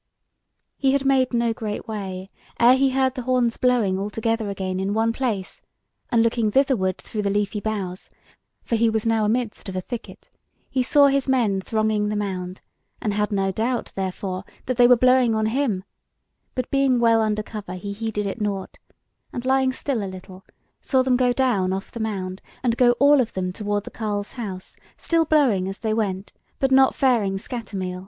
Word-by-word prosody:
He 270 -1 +2
had 275 -1 0
made 265 -2 +3
no 235 -1 +1
great 215 0 -5
way 190 -4 -5 0.3
ere 240 +2 +7
he 270 +1 +3
heard 260 0 +1
the 255 - -5
horns 250 -2 +1
blowing 230 -7 +2
all 200 +1 -3
together 225 0 -1
again 190 -1 -3
in 195 +2 -1
one 225 +1 +2
place, 225 -7 -3 0.5
and 230 -2 +3
looking 230 -1 +1
thitherward 215 -7 +2
through 215 - -5
the 200 - 0
leafy 205 +1 -1
boughs 200 -4 -4 0.5
(for 235 - -1
he 230 0 +3
was 220 0 -1
now 225 -1 +2
amidst 225 -1 -1
of 190 - -6
a - - 0
thicket) 235 +5 -8 0.4
he 260 - +1
saw 285 +3 +5
his 275 -1 +2
men 220 -7 +2
thronging 215 0 0
the 210 - -2
mound, 185 -3 -4 0.4
and 210 - -1
had 210 +1 0
no 195 -1 +1
doubt 235 +5 -2
therefore 185 0 -4 0.2
that 255 - -1
they 240 +1 +6
were 250 - +7
blowing 255 -1 +4
on 220 0 +1
him; 220 -5 0 0.7
but 255 -2 -3
being 275 -2 +3
well 230 -1 +4
under 215 -1 0
cover 205 -4 -7
he 200 +2 -5
heeded 210 -1 -3
it 200 +3 -4
nought, 200 -2 -3 0.5
and 245 - -5
lying 265 0 +3
still 260 -4 -2
a 195 - -4
little, 185 0 -11 0.4
saw 260 -2 +2
them 255 -1 +2
go 250 0 +3
down 240 -8 +1
off 195 +2 -4
the 235 - -7
mound 190 -4 -3 0.2
and 235 -2 +2
go 240 0 +5
all 280 +3 +5
of 235 - -3
them 185 -1 -2
toward 205 0 -2
the - - -9
carle's 205 -2 -3
house, 195 -7 -7 0.2
still 330 -1 +1
blowing 260 -12 +3
as 195 +1 -5
they 220 -1 -1
went, 195 -3 -2 0.2
but 270 -1 0
not 265 0 +5
faring 230 -8 +2
scatter 220 -1 -6
meal. 180 -1 -4
220 Hz, 195 wpm, -23 LUFS, 195-250 Hz, 0.7 s, ere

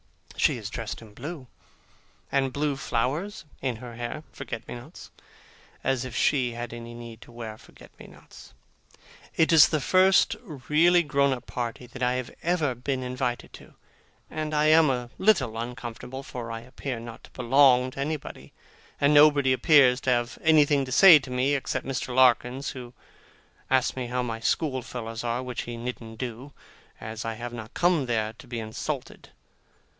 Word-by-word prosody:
She - - +2
is - - -7
dressed - - -5
in 105 -2 -15
blue, 145 +4 -7 0.9
with 135 -2 +1
blue 145 -1 0
flowers 140 - -2 0.2
in 130 -3 -1
her 120 +1 -9
hair 120 +6 -5
forget 110 - -7
me - - -6
nots 120 +7 -11 0.7
as 130 -3 0
if 130 -2 -7
SHE 125 -4 +2
had 120 0 -6
any 120 0 -8
need 115 -1 -10
to - - -14
wear 115 -2 -8
forget - - -17
me - - -11
nots. - - -16 0.8
It 160 +1 +3
is 155 -3 +9
the 155 - 0
first 190 +6 +4
really 160 +4 +2
grown 140 -2 +2
up 130 -2 -4
party 120 0 -5
that 120 - -11
I 125 0 +2
have 125 -1 -4
ever 165 -6 +1
been 130 +2 -3
invited 125 -1 -3
to, - - -14 0.6
and 155 -1 -3
I 150 0 +3
am 155 0 +6
a 125 -2 -2
little 190 - +3
uncomfortable; 120 +2 -6
for 120 -3 -7
I 115 0 -5
appear 125 +1 -6
not 115 -1 -10
to - - -20
belong 130 0 +4
to 135 - -10
anybody, 150 +1 -5 0.5
and 145 +1 +4
nobody 145 -3 +6
appears 135 -3 +5
to - - -1
have 120 -1 0
anything 150 -3 +4
to 130 - -8
say 170 +2 +9
to 130 - -10
me, 125 +3 +1
except 140 - -2
Mr. 130 -1 -3
Larkins, 130 +1 +3
who 125 -3 -9 0.8
asks 130 -1 +2
me 130 -2 -4
how 125 +1 -1
my 115 -2 -4
schoolfellows 125 -4 -2
are, 120 +1 -2
which 125 -1 -4
he 120 -1 -7
needn't 115 -2 -6
do, 125 +4 -6 0.5
as 110 +1 -6
I 115 0 -3
have 120 +1 -7
not 115 +1 -9
come 170 -6 +2
there 110 -2 -1
to - - -13
be 120 -1 -4
insulted. 110 0 -6
125 Hz, 175 wpm, -26 LUFS, 120-145 Hz, 0.9 s, is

